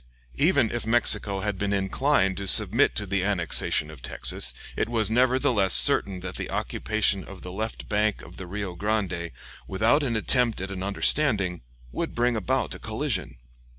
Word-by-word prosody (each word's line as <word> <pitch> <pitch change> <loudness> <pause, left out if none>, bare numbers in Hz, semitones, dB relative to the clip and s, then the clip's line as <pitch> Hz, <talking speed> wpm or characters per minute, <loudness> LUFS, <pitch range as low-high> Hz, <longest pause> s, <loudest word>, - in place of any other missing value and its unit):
Even 140 - +2
if 120 -2 -4
Mexico 105 -4 +2
had 105 -2 -3
been 100 0 -2
inclined 95 +1 0
to 100 0 -4
submit 110 +7 +6
to 105 - -1
the 100 -1 -1
annexation 85 -5 0
of 75 -5 -14
Texas, 65 +1 0 0.2
it - - -2
was 110 -2 -1
nevertheless 125 -4 +2
certain 95 -2 +4
that 95 +1 -6
the - - -5
occupation 105 -3 -1
of 100 -2 -12
the 90 - -7
left 110 +4 -5
bank 105 0 -1
of - - -14
the 95 - -8
Rio 100 0 -5
Grande, 95 -3 -2 0.4
without 110 +10 +2
an 125 -5 -2
attempt 120 +1 +1
at 95 +1 -5
an 95 -1 -6
understanding, 100 - 0 0.3
would - - -4
bring 120 0 +1
about 125 +5 -1
a - - -10
collision. 110 - -3
105 Hz, 170 wpm, -25 LUFS, 95-120 Hz, 0.4 s, submit